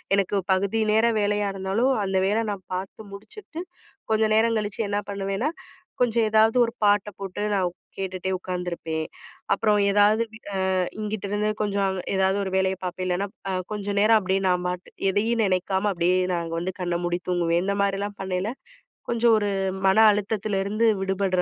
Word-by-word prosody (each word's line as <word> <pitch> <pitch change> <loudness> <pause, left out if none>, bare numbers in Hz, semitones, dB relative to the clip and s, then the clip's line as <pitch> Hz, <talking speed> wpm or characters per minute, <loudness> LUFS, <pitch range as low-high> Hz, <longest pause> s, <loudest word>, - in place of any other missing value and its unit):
எனக்கு 200 0 +1 0.2
பகுதி 200 +4 0
நேர 220 +2 +4 0.2
வேலையா 205 0 +1
இருந்தாலும், 195 +8 +1
அந்த 190 0 0
வேல 220 +3 +1
நான் 195 -2 -7
பார்த்து 195 +2 -7
முடிச்சுட்டு, 325 - -9 0.5
கொஞ்சம் 220 0 +3
நேரம் 230 0 +3
கழிச்சி, 205 +1 -3
என்ன 205 0 0
பண்ணுவேன்னா, 195 +7 -2 0.5
கொஞ்சம் 235 -2 +3
ஏதாவது 220 +1 +4
ஒரு 230 - -4
பாட்ட 205 0 +3
போட்டு, 195 0 -5
நான் 190 -2 +2
ஒக் 175 - -8 0.2
கேட்டுட்டே 190 -1 -3
உக்காந்துருப்பேன். 175 -3 -4 0.5
அப்புறம் 210 +1 +2
ஏதாவது, 205 +2 +4
பி - - -9 0.2
அ - - 0 0.4
இங்கிட்டிருந்து 210 0 -2
கொஞ்சம் 200 -1 0
அவ் 190 -1 -3 0.2
ஏதாவது 190 +1 +2
ஒரு 190 - -4
வேலைய 190 0 +1
பாப்பேன். 180 +1 -3
இல்லைனா, 185 +3 0
ப் - - -59
அ - - -1 0.2
கொஞ்சம் 205 -1 -3
நேரம் 220 +1 +6
அப்படியே 190 -1 0
நான் 180 0 +1
பாட்டு, 180 0 -5 0.2
எதையும் 225 +3 +1
நெனைக்காம 190 +2 0
அப்படியே 175 +1 +2 0.2
நான் 170 -1 -1
அங்க 165 0 -4
வந்து, 185 +2 -3
கண்ண 175 -1 0
மூடி 175 0 -1
தூங்குவேன். 170 -1 +1
இந்த 200 0 0
மாரிலாம் 200 +1 -2
பண்ணயில, 190 +2 -2 0.6
கொஞ்சம் 235 -1 +4
ஒரு 205 -1 -1 0.4
மன 190 +2 +4 0.2
அழுத்தத்துல 205 0 -1
இருந்து 215 +3 +1
விடுபடுற 190 -1 0
200 Hz, 170 wpm, -25 LUFS, 185-215 Hz, 0.6 s, நேரம்